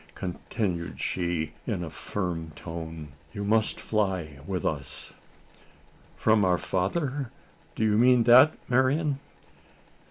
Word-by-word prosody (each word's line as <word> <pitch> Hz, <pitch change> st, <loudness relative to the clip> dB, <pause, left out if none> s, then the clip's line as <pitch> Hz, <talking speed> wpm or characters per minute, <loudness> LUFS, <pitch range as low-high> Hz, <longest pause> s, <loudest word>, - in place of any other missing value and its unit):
continued 90 Hz, -1 st, -3 dB
she 85 Hz, -4 st, -1 dB
in 100 Hz, -7 st, -1 dB
a 85 Hz, -, -5 dB
firm 85 Hz, -5 st, -3 dB
tone, 80 Hz, -2 st, -7 dB, 0.2 s
"you 100 Hz, -2 st, -4 dB
must 110 Hz, +1 st, +2 dB
fly 95 Hz, -9 st, -1 dB
with 95 Hz, -2 st, -2 dB
us!" 70 Hz, -3 st, -1 dB, 1.0 s
"From 110 Hz, -1 st, +4 dB
our 90 Hz, -1 st, +3 dB
father? 130 Hz, -, -1 dB, 0.5 s
Do -, -, -1 dB
you 105 Hz, 0 st, +3 dB
mean 125 Hz, 0 st, +6 dB
that, 130 Hz, +6 st, +7 dB
Marian?" 135 Hz, +3 st, +2 dB
100 Hz, 115 wpm, -27 LUFS, 85-120 Hz, 1.0 s, that